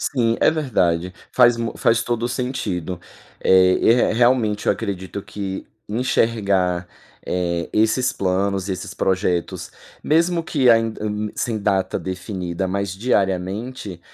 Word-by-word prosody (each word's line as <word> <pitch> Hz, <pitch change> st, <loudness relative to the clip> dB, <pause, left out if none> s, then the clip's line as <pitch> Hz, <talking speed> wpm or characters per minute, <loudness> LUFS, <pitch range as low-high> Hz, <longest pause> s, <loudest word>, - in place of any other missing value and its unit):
Sim, 115 Hz, -4 st, +1 dB
é -, -, +5 dB
verdade, 90 Hz, -, 0 dB, 0.2 s
faz 120 Hz, -2 st, +5 dB
mu 115 Hz, -1 st, -3 dB
faz 115 Hz, 0 st, +2 dB
todo 120 Hz, -1 st, -2 dB
o -, -, 0 dB
sentido. 100 Hz, -9 st, -3 dB, 0.4 s
É, 95 Hz, 0 st, +5 dB
e -, -, +4 dB
re 120 Hz, -2 st, +3 dB
realmente 115 Hz, -3 st, +2 dB
eu -, -, +5 dB
acredito 100 Hz, -2 st, -5 dB
que 100 Hz, -2 st, -6 dB, 0.2 s
enxergar, 100 Hz, -6 st, +1 dB, 0.4 s
eh, 85 Hz, -1 st, -1 dB
esses 110 Hz, +4 st, +2 dB
planos 95 Hz, +1 st, -1 dB
e -, -, 0 dB
esses 95 Hz, -, -6 dB
projetos, 90 Hz, -2 st, -1 dB, 0.3 s
mesmo 170 Hz, +2 st, +2 dB
que 135 Hz, -7 st, +3 dB
ainda, 115 Hz, -2 st, +2 dB
hum, 105 Hz, 0 st, -2 dB
sem 115 Hz, -3 st, -2 dB
data 100 Hz, -2 st, 0 dB
definida 95 Hz, -1 st, -4 dB
mas 100 Hz, +1 st, -2 dB
diariamente, 100 Hz, -1 st, -2 dB
105 Hz, 135 wpm, -21 LUFS, 95-115 Hz, 0.4 s, é